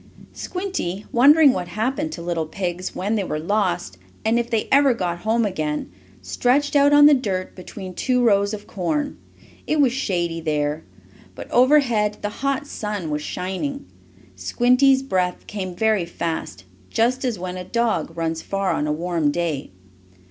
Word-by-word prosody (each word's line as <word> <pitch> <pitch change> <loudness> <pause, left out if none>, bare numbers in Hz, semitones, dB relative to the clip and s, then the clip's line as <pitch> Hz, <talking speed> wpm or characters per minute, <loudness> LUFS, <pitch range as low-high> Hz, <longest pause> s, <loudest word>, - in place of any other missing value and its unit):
Squinty, 360 - -4
wondering 285 +3 +6
what 180 -1 -3
happened 260 - -2
to - - -7
little 170 -2 -2
pigs 180 +1 -4
when 200 +4 -1
they 210 -3 0
were 155 - -3
lost, 175 - -1 0.3
and 225 +2 +3
if 235 0 -3
they 225 -3 0
ever 275 -2 +5
got 175 -5 -2
home 220 +3 +1
again, 155 - -3 0.3
stretched 250 - +1
out 285 0 +5
on 290 0 +7
the 295 - +8
dirt 195 -9 -2
between 185 0 -8
two 250 +6 +1
rows 200 -3 +3
of 210 -1 -6
corn. 285 - -2 0.5
It 310 - +1
was 270 -4 +4
shady 175 -9 -1
there, 150 -1 -1 0.5
but - - -9
over 265 +5 +6
head 210 -5 0
the 205 - 0
hot 275 +6 -2
sun 210 - -4
was 150 0 -2
shining. 190 - -4 0.5
Squinty's 260 +2 +3
breath 185 -8 -1
came 185 -3 -5
very 215 -2 +1
fast, 160 - -4 0.3
just 245 +3 +1
as 245 -5 -1
when 180 0 -5
a 180 - -5
dog 210 -7 -1
runs 165 -1 -2
far 195 -1 -1
on 150 - -1
a - - 0
warm 165 -1 0
day. 160 -3 -2
200 Hz, 165 wpm, -22 LUFS, 175-255 Hz, 0.5 s, the